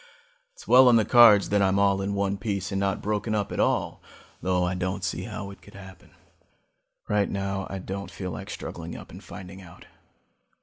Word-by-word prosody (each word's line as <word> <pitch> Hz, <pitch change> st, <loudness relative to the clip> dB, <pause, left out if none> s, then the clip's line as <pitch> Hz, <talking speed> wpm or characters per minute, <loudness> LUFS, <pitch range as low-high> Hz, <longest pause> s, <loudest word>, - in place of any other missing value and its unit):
It's -, -, -15 dB
well 130 Hz, +1 st, +7 dB
on 120 Hz, -, +6 dB
the 110 Hz, -2 st, +4 dB
cards 115 Hz, -5 st, +7 dB
that 105 Hz, 0 st, +2 dB
I'm 95 Hz, 0 st, +2 dB
all 100 Hz, -1 st, +2 dB
in 100 Hz, +1 st, -2 dB
one 100 Hz, 0 st, -1 dB
piece 100 Hz, -2 st, -3 dB
and 95 Hz, -, -1 dB
not 100 Hz, -1 st, -1 dB
broken 105 Hz, +1 st, -1 dB
up 105 Hz, -2 st, -2 dB
at -, -, -4 dB
all, -, -, 0 dB, 0.4 s
though 90 Hz, -1 st, +1 dB
I 90 Hz, 0 st, 0 dB
don't 90 Hz, +1 st, -3 dB
see -, -, -3 dB
how 105 Hz, -3 st, -6 dB
it 100 Hz, -, -14 dB
could -, -, -16 dB
happen. 95 Hz, -1 st, -14 dB, 0.9 s
Right 105 Hz, -1 st, +1 dB
now 100 Hz, -1 st, -3 dB
I 95 Hz, -, -5 dB
don't 100 Hz, +1 st, -6 dB
feel 90 Hz, -2 st, -6 dB
like -, -, -7 dB
struggling 85 Hz, 0 st, -7 dB
up -, -, -12 dB
and -, -, -11 dB
finding 95 Hz, +1 st, -10 dB
out. 85 Hz, -3 st, -15 dB
100 Hz, 205 wpm, -26 LUFS, 95-105 Hz, 0.9 s, well